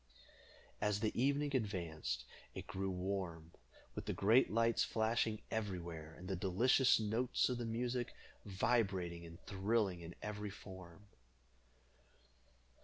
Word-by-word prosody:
As 105 -1 +2
the 110 - +1
evening 140 +3 +2
advanced, 85 - -2 0.3
it - - -5
grew 95 +1 -2
warm, 90 -3 -3 0.4
with - - -6
the - - 0
great 115 +7 +5
lights 115 +1 +3
flashing 110 -1 +1
everywhere, 85 -7 -3
and 90 - -9
the 95 - -1
delicious 115 +9 +4
notes 110 +5 +1
of 125 -1 -1
the 120 - -2
music 120 +2 -1 0.3
vibrating 95 -5 0
and 85 +1 -11
thrilling 100 -2 +1
in 85 +1 -8
every 105 0 -3
form. 95 -1 -11
100 Hz, 120 wpm, -38 LUFS, 90-115 Hz, 0.4 s, great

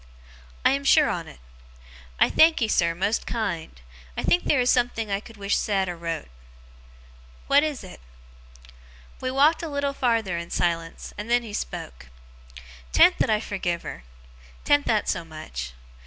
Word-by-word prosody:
'I - - +6
am 275 +1 0
sure 300 +2 +5
on't. 165 - -6 0.8
I - - +6
thankee, 315 -8 +4
sir, 170 -5 +2
most 200 +6 -1
kind! 170 - -3 0.4
I - - -2
think 355 - +3
theer 280 - +3
is 245 - +3
something 240 -4 0
I 195 - +1
could 225 +1 -14
wish 200 0 0
said 195 -2 0
or 175 - -4
wrote.' 165 - -4 1.2
'What 280 +1 +5
is 300 -6 -3
it?' 185 - -11 1.2
We 255 - -2
walked 285 +5 +3
a 330 - -4
little 285 -1 -1
farther 225 -9 0
in 170 0 -7
silence, 165 -1 -2
and 210 +2 -6
then 240 0 +3
he 220 -3 -9
spoke. - - -6 0.8
''Tan't - - +5
that - - +2
I 215 -1 +3
forgive 180 -5 -3
her. - - -7 0.6
'Tan't 290 0 +3
that 215 -2 +1
so 170 - -1
much. 60 - -7
210 Hz, 160 wpm, -25 LUFS, 170-260 Hz, 1.2 s, I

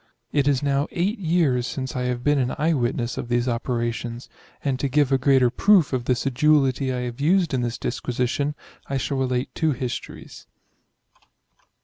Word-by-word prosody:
It 145 -2 +1
is 140 -1 +2
now 140 +1 +1
8 195 +6 -1
years 160 -9 +1
since 130 -2 -5
I 125 0 -1
have 125 -1 -2
been 145 -1 +3
an 125 -1 -1
eye 160 +3 +2
witness 120 -3 -1
of 120 - -6
these 120 +1 +1
operations; 120 0 -3 0.3
and 135 -2 -1
to 140 - -1
give 145 0 +2
a 135 - +3
greater 130 -2 +4
proof 195 -5 +4
of 125 -2 -1
the 125 - +2
sedulity 135 0 +2
I 125 -1 -2
have 125 +2 -5
used 175 +1 +2
in 130 - +1
this 120 -1 -2
dis 120 - -3
quisition, 130 +4 -1 0.3
I 135 - -1
shall 135 +2 -2
relate 130 0 -1
2 160 -3 +1
histories. 125 -1 -7
130 Hz, 185 wpm, -23 LUFS, 125-145 Hz, 0.3 s, greater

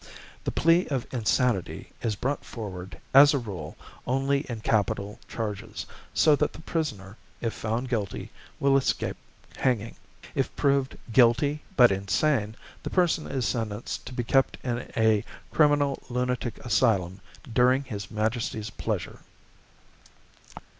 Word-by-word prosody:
The - - 0
plea 165 +3 +3
of 135 -4 -2
insanity 120 -3 0
is 110 -3 -1
brought 135 +7 -2
forward, 95 -5 -7
as 145 +2 +8
a - - +3
rule, 95 - -6 0.3
only 135 +2 +2
in 115 -3 -4
capital 105 -2 0
charges, 105 -1 -5 0.3
so 155 -2 +5
that 150 - 0
the - - -10
prisoner, 120 - -3 0.2
if 115 -2 -2
found 115 +4 -2
guilty, 110 -6 -3 0.3
will 140 0 +4
escape 135 - 0 0.4
hanging. 115 -4 0 0.4
If - - -1
proved 140 -1 +1 0.2
'guilty, 135 +5 +4 0.2
but 120 -4 +8
insane,' 105 +4 +1 0.3
the - - -4
person 175 -3 +2
is 130 -3 -1
sentenced 110 -2 -3
to 130 - -7
be 120 - -2
kept 135 +3 +2
in 120 -1 -3
a 110 -2 +4 0.3
criminal 145 -2 +3
lunatic 125 -1 -1
asylum 100 -6 +2 0.2
'during 125 +3 +3
His 105 -7 -6
Majesty's 110 -1 -2
pleasure.' - - -3
120 Hz, 130 wpm, -27 LUFS, 105-135 Hz, 0.4 s, as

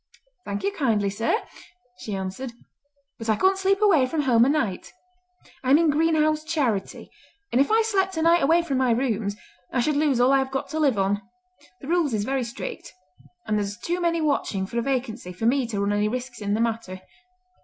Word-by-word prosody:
"Thank 200 0 -4
you 400 - +1
kindly, 225 - 0
sir!" 225 - 0 0.6
she 210 - -5
answered, 195 +7 -5 0.7
"but 225 0 -5
I 215 - +4
couldn't 380 - +2
sleep 390 +2 +1
away 320 -11 +4
from 305 +3 -1
home 240 -3 +4
a - - +2
night. 255 -11 -1 0.7
I 255 - -1
am 280 - +7
in 325 -2 +3
Greenhow's 310 0 +2
Charity, 280 -11 -2 0.4
and 250 - +3
if 280 - +2
I 445 +1 +4
slept 385 -4 0
a 320 - 0
night 335 +1 +4
away 330 +5 +3
from 275 -6 -1
my 260 -1 +2
rooms 225 -4 0 0.4
I 255 - 0
should 295 +5 +1
lose 285 -4 +2
all 250 +2 +4
I 275 - +5
have 265 0 -1
got 270 0 -3
to 315 - -3
live 275 -8 +2
on. 200 +1 +1 0.6
The 275 - -9
rules 325 -7 +1
is 205 - -1
very 265 +3 -1
strict; 235 +3 -7 0.5
and 215 -1 0
there's 205 0 -3
too 345 +8 -3
many 335 -1 +1
watching 275 -10 0
for 235 +5 -3
a - - +1
vacancy 240 -7 -3
for 200 +5 -4
me 255 +1 +2
to 215 -3 -3
run 200 +1 0
any 205 0 +1
risks 245 +1 -5
in 205 0 0
the 220 - 0
matter. 225 -5 -3
260 Hz, 210 wpm, -24 LUFS, 215-310 Hz, 0.7 s, am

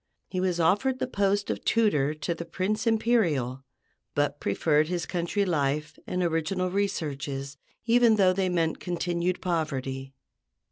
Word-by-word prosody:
He 185 - -3
was 180 -2 0
offered 205 +11 +2
the - - -1
post 200 -4 0
of - - -5
tutor 155 -11 +2
to 155 +3 -2
the 170 - -6
Prince 190 +7 -2
Imperial, 170 - +1 0.5
but 145 0 0
preferred 150 +9 +2
his 175 -1 -2
country 180 +3 -1
life 150 -2 0
and 180 0 -1
original 175 +2 0
researches, 145 -8 -2 0.3
even 235 -1 +5
though 190 -3 +4
they 190 0 0
meant 165 -2 0
continued 175 0 -1
poverty. 135 -6 -2
175 Hz, 140 wpm, -27 LUFS, 150-195 Hz, 0.5 s, even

